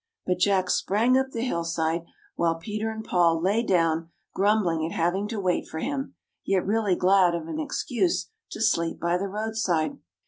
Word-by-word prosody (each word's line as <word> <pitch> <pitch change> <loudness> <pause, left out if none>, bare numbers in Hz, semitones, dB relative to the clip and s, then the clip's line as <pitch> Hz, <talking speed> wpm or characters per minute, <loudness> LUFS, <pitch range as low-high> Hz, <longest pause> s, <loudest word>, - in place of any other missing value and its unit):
But 180 -1 0
Jack 185 -1 +2
sprang 225 +6 +2
up 265 0 +2
the 235 -3 -4
hillside, 165 -5 -1 0.3
while 165 -1 +1
Peter 215 +6 -4
and 220 0 -6
Paul 170 -2 +3
lay 200 +7 +2
down, 165 -6 +1 0.2
grumbling 195 -6 +2
at 165 - -3
hav 170 +1 +2
ing 200 +2 -2
to 220 -1 -4
wait 185 -2 0
for - - -7
him, 275 - -3 0.3
yet 195 -2 +1
really 205 -2 +1
glad 180 -1 +4
of 165 -1 -5
an 305 - -4
excuse 310 - -1 0.2
to - - -7
sleep 170 -7 +1
by 170 +1 0
the 200 - -2
roadside. 200 -7 -1
190 Hz, 180 wpm, -26 LUFS, 170-220 Hz, 0.3 s, glad